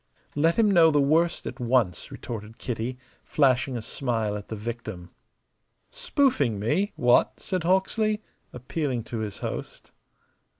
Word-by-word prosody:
"Let 160 +3 +3
him 220 -3 +4
know 170 -4 +6
the 150 -2 +3
worst 160 +5 +2
at - - -6
once," 120 -7 +1
retorted 110 -1 -7
Kitty, 125 +1 -4 0.3
flashing 130 -3 +2
a 115 - -6
smile 115 -4 -2
at 105 -1 -7
the 110 - -5
victim. 110 -5 -6 0.8
"Spoofing 275 - +1
me 175 - 0
what?" 120 0 +3
said 185 -2 -2
Hawksley, 210 +4 +1 0.3
appealing 125 0 -3
to 115 0 -5
his 105 -2 -4
host. - - -6
125 Hz, 135 wpm, -26 LUFS, 115-170 Hz, 0.8 s, know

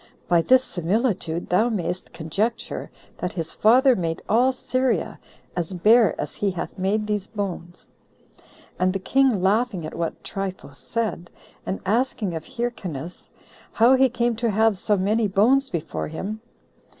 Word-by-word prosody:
by 170 -1 +4
this 255 +8 +5
similitude 180 -3 -1
thou 215 +7 +3
mayst 180 -4 -3
conjecture 200 +9 -3 0.3
that 180 - -3
his 165 -2 -4
father 255 +4 +5
made 165 -4 -2
all 245 +4 +4
Syria 255 -5 -1 0.4
as 175 +1 -3
bare 215 +2 +4
as 150 - -4
he 205 - -1
hath 180 -3 -5
made 205 +3 0
these 210 -1 -2
bones." 185 -5 -6 0.9
And 185 0 +2
the - - 0
king 250 -1 +2
laughing 205 -3 +1
at 155 - -6
what 170 -1 -4
Trypho 195 -7 -5
said, 210 -2 -2 0.4
and 190 - -2
asking 220 -2 0
of 160 -1 -5
Hyrcanus, 180 - -5 0.4
How 235 +3 +5
he 265 0 +5
came 240 -1 0
to 235 0 0
have 220 +1 +3
so 205 +2 +1
many 210 +4 +1
bones 245 +8 +3
before 170 -6 -3
him? 200 +7 -5
205 Hz, 150 wpm, -23 LUFS, 180-235 Hz, 0.9 s, this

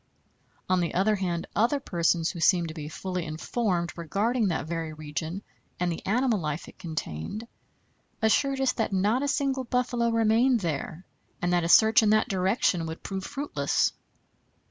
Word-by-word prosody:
On 185 0 +2
the 170 -2 -1
other 195 +4 +3
hand, 175 -3 -2
other 240 +7 +2
persons 170 -7 +1
who 175 - -8
seemed 170 0 +3
to - - -6
be 150 -2 -6
fully 180 +1 -4
informed 175 +3 -2
regarding 205 +8 0
that 165 -5 -1
very 165 -1 -4
region 155 +4 -5 0.4
and 175 0 +1
the 165 - -5
animal 235 +1 +2
life 150 -1 -4
it - - -15
contained, 160 - -5 0.7
assured 270 +5 +2
us 265 -1 +3
that 225 -3 -2
not 205 +7 +2
a 285 - 0
single 270 -2 0
buffalo 240 -1 0
remained 230 +2 +3
there, 165 +1 -4 0.3
and 175 0 0
that 175 -1 +2
a 165 - -1
search 220 +5 +7
in 215 - +3
that 215 +2 +3
direction 185 -3 +1
would 160 +1 -7
prove 190 -1 -4
fruitless. 285 0 0
190 Hz, 165 wpm, -27 LUFS, 170-230 Hz, 0.7 s, search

